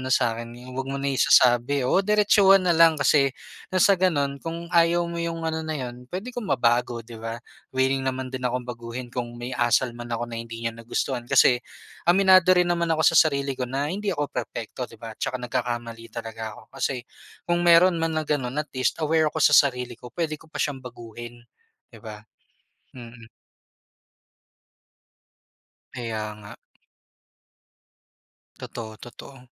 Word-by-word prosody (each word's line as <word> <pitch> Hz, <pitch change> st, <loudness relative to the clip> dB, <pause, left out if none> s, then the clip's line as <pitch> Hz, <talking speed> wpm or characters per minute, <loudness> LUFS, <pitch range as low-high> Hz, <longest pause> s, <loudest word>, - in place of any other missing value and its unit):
na 130 Hz, -, -4 dB
sa'kin, 120 Hz, -2 st, 0 dB
'yo 125 Hz, +1 st, -11 dB
huwag 135 Hz, 0 st, -4 dB
mo 140 Hz, -, -3 dB
na 140 Hz, -, -3 dB
isasabi." 125 Hz, +1 st, +4 dB
Oo, 185 Hz, -, +3 dB
diretsuhan 200 Hz, -2 st, +5 dB
na 175 Hz, -, +4 dB
lang. 165 Hz, -1 st, +6 dB
Kasi, 140 Hz, 0 st, +3 dB, 0.4 s
ng 185 Hz, -, -2 dB
sa 200 Hz, +2 st, +5 dB
gano'n 140 Hz, -7 st, +1 dB
kung 165 Hz, +1 st, -5 dB
ayaw 170 Hz, +1 st, +4 dB
mo 170 Hz, 0 st, -4 dB
'yong 165 Hz, -1 st, -4 dB
ano 160 Hz, 0 st, -1 dB
na 155 Hz, -1 st, -3 dB
'yon, 125 Hz, -2 st, -7 dB
puwede 200 Hz, +8 st, -5 dB
kong 235 Hz, -5 st, -5 dB
mabago, 120 Hz, 0 st, +1 dB
'di 115 Hz, 0 st, -11 dB
ba, 115 Hz, 0 st, -5 dB, 0.3 s
wiling 130 Hz, +1 st, +1 dB
naman 130 Hz, 0 st, -2 dB
din 130 Hz, -1 st, -5 dB
akong 125 Hz, 0 st, -3 dB
baguhin 120 Hz, +1 st, -6 dB
kung 120 Hz, -2 st, -5 dB
may 125 Hz, +2 st, -6 dB
asal 120 Hz, +1 st, +2 dB
man 120 Hz, 0 st, -8 dB
ako 120 Hz, 0 st, -2 dB
na 115 Hz, -1 st, -6 dB
hindi 115 Hz, 0 st, -8 dB
niya 115 Hz, -, -1 dB
nagustuhan. 120 Hz, +1 st, -3 dB
Kasi, 125 Hz, -2 st, +5 dB, 0.5 s
aminado 185 Hz, 0 st, +6 dB
rin 180 Hz, -, +5 dB
naman 170 Hz, -1 st, 0 dB
ako 155 Hz, -2 st, +2 dB
sa 155 Hz, -, +7 dB
sarili 140 Hz, -1 st, -2 dB
ko 125 Hz, -1 st, -4 dB
na, 140 Hz, +2 st, -1 dB
hindi 205 Hz, +2 st, -4 dB
ako 145 Hz, -4 st, -1 dB
perpekto, 120 Hz, +1 st, -5 dB
'di 115 Hz, -, -14 dB
ba, 115 Hz, 0 st, -8 dB
'tsaka 130 Hz, +3 st, -3 dB
nagkakamali 120 Hz, -2 st, -4 dB
talaga 115 Hz, -2 st, -7 dB
ako. -, -, -13 dB
Kasi, 130 Hz, -2 st, -2 dB, 0.4 s
kung 175 Hz, 0 st, +1 dB
meron 170 Hz, 0 st, +5 dB
man 165 Hz, -1 st, -1 dB
na 155 Hz, -, 0 dB
gano'n, 135 Hz, -3 st, -2 dB
at 150 Hz, -1 st, -4 dB
least 130 Hz, 0 st, 0 dB
aware 160 Hz, 0 st, +2 dB
ko -, -, -11 dB
sa 155 Hz, -, +6 dB
sarili 125 Hz, -4 st, +3 dB
ko, 125 Hz, -, -10 dB
puwede 155 Hz, -3 st, -2 dB
ko -, -, -17 dB
pa -, -, -10 dB
siyang 145 Hz, -2 st, -2 dB
baguhin, 120 Hz, -1 st, -10 dB, 0.5 s
'di 115 Hz, -, -13 dB
ba. 105 Hz, -1 st, -9 dB, 0.8 s
Mm. 115 Hz, -1 st, -12 dB, 2.6 s
Kaya 115 Hz, -3 st, -4 dB, 0.2 s
nga. 105 Hz, -1 st, -12 dB, 2.1 s
Totoo, 110 Hz, -2 st, -8 dB
totoo. 135 Hz, +2 st, -12 dB
130 Hz, 170 wpm, -24 LUFS, 120-160 Hz, 2.6 s, sa